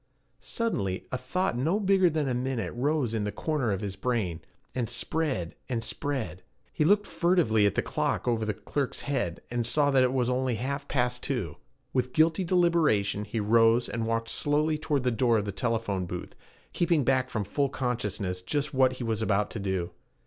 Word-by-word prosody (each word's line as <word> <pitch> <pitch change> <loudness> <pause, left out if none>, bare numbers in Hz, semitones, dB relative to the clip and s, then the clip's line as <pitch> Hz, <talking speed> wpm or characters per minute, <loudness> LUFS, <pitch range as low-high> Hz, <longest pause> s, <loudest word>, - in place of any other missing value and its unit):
Suddenly 160 - -1
a 95 - -6
little 130 - -4
thought 130 +5 -1
no 160 - +1
bigger 190 -3 +4
than 155 -3 -1
a 130 - 0
minute 125 -6 -2
rose 135 -1 0
in 110 - 0
one 105 - -2
corner 150 -8 -1
of 95 - -2
his 100 -2 -4
brain, 100 -6 -1 0.3
and 120 -3 -1
spread, 120 - -1 0.2
and 115 -3 -1
spread. 130 -11 -2 0.3
He - - +1
looked 205 +5 +4
furtively 165 - +3
at 100 - -1
the - - +1
clock - - -1
over 115 -2 +1
the 105 -1 -1
clerk's 140 +5 -3
head, 130 -12 -2
and 120 -1 0
saw 145 +5 +2
that 135 -1 +4
it 130 -1 +3
was 130 -2 +1
only 125 -1 0
half 140 +5 -3
past 125 -2 0
two. 110 - -3 0.4
With 125 -1 0
guilty 160 +4 +3
deliberation 165 - +2
he 105 +2 -3
rose 115 +2 +4
and 115 -1 -3
walked 115 0 -1
slowly 150 +3 +1
toward 145 -4 0
the 125 - +2
door 115 0 +3
of 105 - -1
the 100 - -2
telephone 110 -5 -1
booth, 90 0 -6 0.4
keeping 170 -4 +2
back 130 0 +2
from 110 -4 -2
full 140 +7 0
consciousness 105 -8 -2
just 145 +9 -2
what 130 -1 +4
he 130 - -6
was 110 -2 -1
about 105 -1 +1
to 115 - -5
do. 95 -3 -2
125 Hz, 195 wpm, -28 LUFS, 110-145 Hz, 0.4 s, bigger